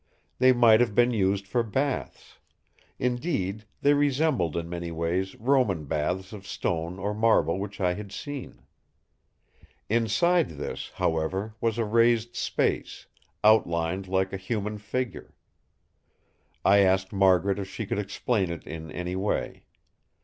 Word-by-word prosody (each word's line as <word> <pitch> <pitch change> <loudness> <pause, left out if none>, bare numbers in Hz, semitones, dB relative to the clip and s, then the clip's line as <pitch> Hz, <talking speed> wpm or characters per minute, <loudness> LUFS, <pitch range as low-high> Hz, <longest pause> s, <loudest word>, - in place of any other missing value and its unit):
They 130 +1 +6
might 120 -3 +6
have 120 -4 +1
been 120 +1 +4
used 100 -2 +1
for 120 +5 0
baths; 135 +5 -3 0.6
indeed, 120 - -2 0.2
they 145 - +5
resembled 145 - +1
in 85 0 -3
many 85 0 -5
ways 85 +3 -2
Roman 115 - +1
baths 90 +7 -2
of 100 -1 -10
stone 85 +1 -2
or 100 +2 -2
marble 105 -6 +2
which 100 +1 -6
I 90 -2 +2
had 100 +1 -8
seen. 145 +5 -7 1.3
Inside 120 - +2
this, 75 - -5
however, 95 +7 -1
was 115 -1 0
a 115 - 0
raised 115 +1 +2
space, - - -1 0.4
outlined 95 -3 +3
like 95 +1 0
a - - -2
human 105 +1 -3
figure. 125 +4 -4 1.3
I 100 +1 +6
asked 95 0 +2
Margaret 95 0 +3
if 95 -1 -5
she 110 - -5
could 100 - -2
explain 100 0 -1
it 85 - -6
in 80 -1 -7
any 90 +1 -4
way. 100 +2 -2
100 Hz, 135 wpm, -27 LUFS, 90-115 Hz, 1.3 s, They